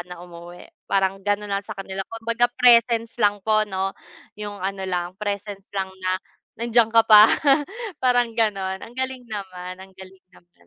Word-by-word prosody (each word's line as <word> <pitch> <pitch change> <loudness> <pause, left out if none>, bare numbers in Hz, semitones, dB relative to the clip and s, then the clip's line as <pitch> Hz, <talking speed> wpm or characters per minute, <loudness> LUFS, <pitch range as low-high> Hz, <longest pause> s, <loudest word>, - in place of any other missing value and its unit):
na 180 - -7
umuwi 175 0 -12 0.2
parang 195 0 +1
gano'n 205 +1 -1
lang 200 0 -1
sa 215 -1 -8
kanila 195 0 -5
kumbaga 230 +1 0
presence 235 -2 +4
lang 205 -1 +3
po 215 -1 +3
'no? 190 0 -2 0.4
'Yong 205 -1 -7
ano 195 +1 -4
lang, 175 -1 -2
presence 200 -1 -5
lang 190 -1 -2
na 185 0 0 0.5
nandiyan 235 -1 +3
ka 230 0 +5
pa 215 0 +9 0.7
parang 245 -2 +2
gano'n 195 -4 0
ang 235 - -10
galing 260 -1 -3
naman, 185 -3 -6
ang 190 0 -13
galing 190 0 -14
naman, 175 - -24
205 Hz, 165 wpm, -23 LUFS, 190-225 Hz, 0.7 s, pa